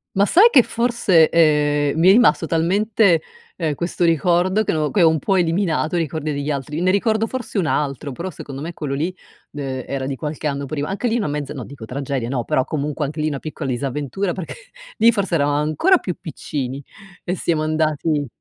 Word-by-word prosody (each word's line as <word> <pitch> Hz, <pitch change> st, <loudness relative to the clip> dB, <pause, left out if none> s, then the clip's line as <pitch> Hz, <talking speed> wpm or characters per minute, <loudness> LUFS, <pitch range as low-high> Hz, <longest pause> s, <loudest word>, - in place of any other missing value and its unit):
Ma 200 Hz, +1 st, +4 dB
sai 385 Hz, -, +6 dB
che 260 Hz, -, +7 dB
forse, 230 Hz, -9 st, +2 dB
ehm, 150 Hz, -2 st, +2 dB
mi 170 Hz, +3 st, +5 dB
è -, -, +9 dB
rimasto 210 Hz, -5 st, +4 dB
talmente, 180 Hz, +2 st, +2 dB, 0.3 s
ehm, 160 Hz, -4 st, -2 dB
questo 175 Hz, +3 st, -2 dB
ricordo 175 Hz, +5 st, +2 dB
che -, -, 0 dB
no 155 Hz, -2 st, 0 dB
che 195 Hz, -, +3 dB
ho -, -, +7 dB
un 160 Hz, -1 st, +2 dB
po' 195 Hz, +5 st, +1 dB
eliminato 170 Hz, -2 st, 0 dB
i -, -, +2 dB
ricordi 155 Hz, -1 st, -2 dB
degli 140 Hz, +1 st, -3 dB
altri, 145 Hz, +3 st, -4 dB
ne 185 Hz, -, +3 dB
ricordo 220 Hz, +2 st, +1 dB
forse 250 Hz, -3 st, -5 dB
un 185 Hz, -, +1 dB
altro 145 Hz, -1 st, -2 dB
però 170 Hz, +8 st, -5 dB
secondo 140 Hz, -4 st, -8 dB
me 165 Hz, +3 st, -5 dB
quello 145 Hz, -4 st, -4 dB
lì, 165 Hz, +6 st, -2 dB, 0.4 s
ehm, 135 Hz, -3 st, -4 dB
era 135 Hz, -1 st, -3 dB
di 135 Hz, -1 st, -4 dB
qualche 150 Hz, 0 st, -4 dB
anno 140 Hz, -1 st, -2 dB
prima. 145 Hz, +1 st, -4 dB
Anche 200 Hz, +6 st, -2 dB
lì 230 Hz, -, 0 dB
una 225 Hz, -7 st, 0 dB
mezza, 145 Hz, -2 st, -4 dB
no, -, -, -6 dB
dico 135 Hz, -5 st, -10 dB
tragedia 130 Hz, 0 st, -3 dB
no, 125 Hz, -1 st, -2 dB
però 130 Hz, -, 0 dB
comunque 150 Hz, 0 st, -2 dB
anche 150 Hz, +2 st, -4 dB
lì 155 Hz, -, +1 dB
una 140 Hz, -, -4 dB
piccola 155 Hz, -2 st, -5 dB
disavventura, 145 Hz, +8 st, -2 dB
perché 185 Hz, -2 st, -6 dB, 0.4 s
lì 230 Hz, +1 st, +5 dB
forse 200 Hz, -5 st, -1 dB
eravam 145 Hz, -2 st, +1 dB
ancora 155 Hz, -, +3 dB
più 185 Hz, -, -4 dB
piccini 140 Hz, -5 st, -5 dB, 0.4 s
e 180 Hz, -, -2 dB
siamo 165 Hz, -2 st, 0 dB
andati 155 Hz, -1 st, 0 dB
155 Hz, 210 wpm, -20 LUFS, 145-185 Hz, 0.4 s, è